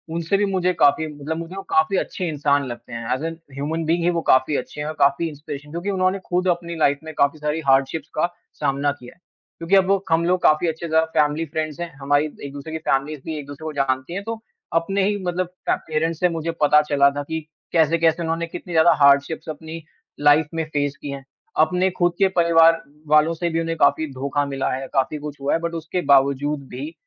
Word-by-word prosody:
उनसे 170 Hz, +4 st, 0 dB
भी 205 Hz, -, +2 dB
मुझे 185 Hz, -1 st, +1 dB
काफ़ी 160 Hz, 0 st, +3 dB
मतलब 150 Hz, +1 st, -5 dB
मुझे 170 Hz, +3 st, -7 dB
वो 195 Hz, -, -5 dB
काफ़ी 160 Hz, +5 st, +2 dB
अच्छे 180 Hz, -1 st, -2 dB
इंसान 145 Hz, -2 st, +1 dB
लगते 120 Hz, 0 st, -9 dB
हैं 115 Hz, 0 st, -5 dB
ऐज़ 130 Hz, +5 st, -3 dB
इन 165 Hz, 0 st, -4 dB, 0.2 s
ह्यूमन 155 Hz, +4 st, -3 dB
बीइंग 170 Hz, +1 st, +1 dB
ही 175 Hz, -, +3 dB
वो 170 Hz, -1 st, -1 dB
काफ़ी 130 Hz, +3 st, +4 dB
अच्छे -, -, -6 dB
हैं 150 Hz, -, -3 dB
और 155 Hz, -, -3 dB
काफ़ी 140 Hz, +4 st, +3 dB
इंस्पिरेशन 150 Hz, 0 st, -9 dB
क्योंकि 175 Hz, +4 st, -4 dB
उन्होंने 185 Hz, 0 st, +1 dB
ख़ुद 180 Hz, +1 st, +1 dB
अपनी 170 Hz, -1 st, -2 dB
लाइफ 145 Hz, -3 st, +2 dB
में 160 Hz, -, -8 dB
काफ़ी 140 Hz, +2 st, +2 dB
सारी 150 Hz, +1 st, -1 dB
हार्डशिप्स 135 Hz, +4 st, +2 dB
का 155 Hz, -, +2 dB, 0.3 s
सामना 140 Hz, +1 st, +1 dB
किया 125 Hz, 0 st, -12 dB
है। -, -, -34 dB, 0.4 s
क्योंकि 170 Hz, +4 st, +1 dB
अब 190 Hz, -1 st, +4 dB
वो 195 Hz, 0 st, +2 dB
हम 165 Hz, +1 st, +3 dB
लोग 180 Hz, +1 st, +1 dB
काफ़ी 155 Hz, +3 st, +4 dB
अच्छे 165 Hz, +1 st, -3 dB
जा 160 Hz, 0 st, +4 dB
फैमिली 150 Hz, +2 st, +2 dB
फ्रेंड्स 155 Hz, 0 st, -4 dB
हैं 170 Hz, -1 st, -4 dB
हमारी 145 Hz, +2 st, +2 dB, 0.2 s
एक-दूसरे 140 Hz, +3 st, -8 dB
की -, -, -1 dB
फैमिलीज़ 135 Hz, +2 st, 0 dB
भी 160 Hz, -1 st, -4 dB
एक-दूसरे 145 Hz, +1 st, -9 dB
को 155 Hz, -, -4 dB
जानती 130 Hz, +2 st, -1 dB
हैं। 195 Hz, +2 st, -4 dB
तो 225 Hz, 0 st, -5 dB, 0.3 s
अपने 190 Hz, +4 st, +1 dB
ही 205 Hz, +1 st, +1 dB
मतलब 180 Hz, 0 st, -1 dB, 0.2 s
ट -, -, +4 dB
पेरेंट्स 160 Hz, +1 st, -1 dB
से 180 Hz, -, +3 dB
मुझे 165 Hz, 0 st, -3 dB
पता 150 Hz, +1 st, +6 dB
चला 140 Hz, -1 st, +5 dB
था 145 Hz, 0 st, -4 dB
कि 160 Hz, +2 st, -4 dB, 0.3 s
कैसे-कैसे 165 Hz, +1 st, +3 dB
उन्होंने 165 Hz, +1 st, -2 dB
कितनी 175 Hz, +1 st, -8 dB
ज़्यादा 160 Hz, +1 st, +6 dB
हार्डशिप्स 140 Hz, +3 st, +3 dB
अपनी 160 Hz, +2 st, -7 dB, 0.4 s
लाइफ 145 Hz, +1 st, +4 dB
में 165 Hz, -, -1 dB
फेस 145 Hz, -1 st, 0 dB
की 145 Hz, -, -6 dB
हैं। 135 Hz, -1 st, -7 dB, 0.4 s
अपने 180 Hz, +2 st, +1 dB
ख़ुद 175 Hz, 0 st, +3 dB
के 195 Hz, -, +5 dB
परिवार 165 Hz, -1 st, +5 dB, 0.3 s
वालों 155 Hz, +2 st, +4 dB
से 170 Hz, +1 st, -2 dB
भी 165 Hz, 0 st, -1 dB
उन्हें 165 Hz, 0 st, -3 dB
काफ़ी 145 Hz, +3 st, +3 dB
धोखा 140 Hz, +2 st, -1 dB
मिला 135 Hz, -1 st, -2 dB
है, 135 Hz, +1 st, -4 dB
काफ़ी 140 Hz, +2 st, +1 dB
कुछ 145 Hz, -1 st, -8 dB
हुआ 140 Hz, -, 0 dB
है। 165 Hz, -, +2 dB
बट 170 Hz, 0 st, -3 dB
उसके 165 Hz, +2 st, -3 dB
बावजूद 140 Hz, +1 st, +1 dB
भी 140 Hz, +6 st, -6 dB
160 Hz, 220 wpm, -22 LUFS, 145-170 Hz, 0.4 s, पता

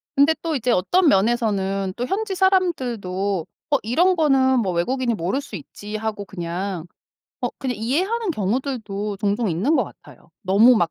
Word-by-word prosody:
근데 285 Hz, +3 st, +5 dB
또 325 Hz, -2 st, -1 dB
이제 250 Hz, -2 st, 0 dB
어떤 335 Hz, -, +3 dB
면에서는 195 Hz, -4 st, +1 dB
또 245 Hz, -, -2 dB
현지 390 Hz, +5 st, -2 dB
사람들도 240 Hz, -, 0 dB, 0.3 s
'어 285 Hz, -, +5 dB
이런 340 Hz, -, +3 dB
거는 265 Hz, -5 st, +3 dB
뭐 190 Hz, -6 st, 0 dB
외국인이 240 Hz, +8 st, 0 dB
모를 195 Hz, +7 st, -1 dB
수 275 Hz, -, -9 dB
있지.' 205 Hz, +6 st, -8 dB
하고 215 Hz, -2 st, -3 dB
그냥 180 Hz, -1 st, -4 dB, 0.6 s
어 -, -, 0 dB
그냥 255 Hz, -3 st, -2 dB
이해하는 370 Hz, -, 0 dB
경우들도 215 Hz, -, -2 dB
종종 205 Hz, +3 st, 0 dB
있는 210 Hz, -, +1 dB
것 -, -, +2 dB
같아요. -, -, -16 dB
너무 215 Hz, +6 st, +6 dB
막 175 Hz, -5 st, +1 dB
230 Hz, 325 characters per minute, -22 LUFS, 195-280 Hz, 0.6 s, 너무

